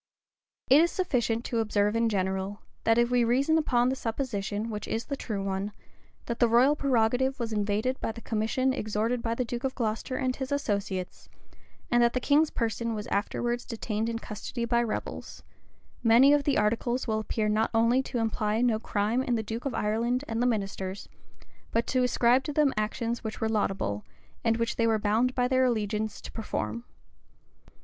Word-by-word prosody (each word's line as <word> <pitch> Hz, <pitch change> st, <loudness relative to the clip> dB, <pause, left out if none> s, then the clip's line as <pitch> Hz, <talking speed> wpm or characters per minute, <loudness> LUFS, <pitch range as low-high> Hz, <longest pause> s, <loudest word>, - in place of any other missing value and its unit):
414 275 Hz, +4 st, +8 dB
It -, -, +6 dB
is 340 Hz, -, +1 dB
sufficient 240 Hz, -, 0 dB
to 230 Hz, -, -1 dB
observe 210 Hz, -1 st, +1 dB
in 230 Hz, 0 st, +2 dB
general, 190 Hz, 0 st, -2 dB, 0.2 s
that 225 Hz, 0 st, +4 dB
if 240 Hz, +1 st, +3 dB
we 245 Hz, -1 st, +4 dB
reason 265 Hz, +7 st, +2 dB
upon 245 Hz, -5 st, +2 dB
the 265 Hz, -, 0 dB
supposition, 225 Hz, -3 st, -3 dB
which 210 Hz, -1 st, -5 dB
is 225 Hz, +1 st, -2 dB
the 280 Hz, -, -3 dB
true 210 Hz, -7 st, -4 dB
one, 195 Hz, +1 st, -2 dB, 0.5 s
that 235 Hz, 0 st, -4 dB
the 240 Hz, -, +5 dB
royal 245 Hz, +6 st, +5 dB
prerogative 260 Hz, -1 st, +1 dB
was 230 Hz, -2 st, -3 dB
invaded 210 Hz, +5 st, 0 dB
by -, -, -1 dB
the 230 Hz, -, -9 dB
commission 225 Hz, +5 st, 0 dB
extorted 220 Hz, +1 st, -1 dB
by 230 Hz, 0 st, -1 dB
the 250 Hz, -, -1 dB
duke 240 Hz, +1 st, -5 dB
of 265 Hz, -1 st, -2 dB
Glocester 225 Hz, +2 st, -2 dB
and 255 Hz, -1 st, -1 dB
his 265 Hz, -1 st, -4 dB
associates, 200 Hz, -9 st, -2 dB, 0.6 s
and 240 Hz, 0 st, +4 dB
that 235 Hz, 0 st, +4 dB
the 255 Hz, -, +1 dB
king's 295 Hz, +4 st, +3 dB
person 230 Hz, 0 st, -2 dB
was 210 Hz, -1 st, -4 dB
afterwards 240 Hz, +4 st, -1 dB
detained 225 Hz, -2 st, -3 dB
in 230 Hz, -, -2 dB
custody 230 Hz, +2 st, -5 dB
by 235 Hz, 0 st, +2 dB
rebels, 230 Hz, -2 st, -5 dB, 0.6 s
many 245 Hz, +5 st, +6 dB
of 290 Hz, -1 st, +2 dB
the 285 Hz, -, +2 dB
articles 235 Hz, +4 st, 0 dB
will 220 Hz, -1 st, 0 dB
appear 215 Hz, 0 st, -1 dB
not 215 Hz, +1 st, +2 dB
only 230 Hz, +3 st, +3 dB
to 260 Hz, -, -4 dB
imply 220 Hz, -1 st, 0 dB
no 235 Hz, -3 st, +2 dB
crime 220 Hz, +2 st, 0 dB
in 250 Hz, -2 st, 0 dB
the 220 Hz, -, -1 dB
duke 225 Hz, +4 st, -5 dB
of 275 Hz, -, -2 dB
Ireland 235 Hz, +5 st, 0 dB
and 225 Hz, +1 st, -2 dB
the 245 Hz, -, +3 dB
ministers, 195 Hz, -3 st, -3 dB, 0.6 s
but 230 Hz, +1 st, 0 dB
to 255 Hz, -, +1 dB
ascribe 250 Hz, +1 st, +3 dB
to 295 Hz, -, -3 dB
them 290 Hz, -2 st, +3 dB
actions 230 Hz, +2 st, -2 dB
which 220 Hz, -1 st, -5 dB
were 220 Hz, -, 0 dB
laudable, 195 Hz, -, -1 dB, 0.4 s
and 225 Hz, -1 st, +2 dB
which 230 Hz, 0 st, -1 dB
they 230 Hz, -, +3 dB
were 225 Hz, -1 st, +3 dB
bound 220 Hz, +5 st, +1 dB
by 250 Hz, -1 st, +2 dB
their 260 Hz, 0 st, +3 dB
allegiance 215 Hz, -2 st, -1 dB
to -, -, -9 dB
perform. 115 Hz, -, -4 dB
230 Hz, 190 wpm, -28 LUFS, 215-250 Hz, 0.6 s, 414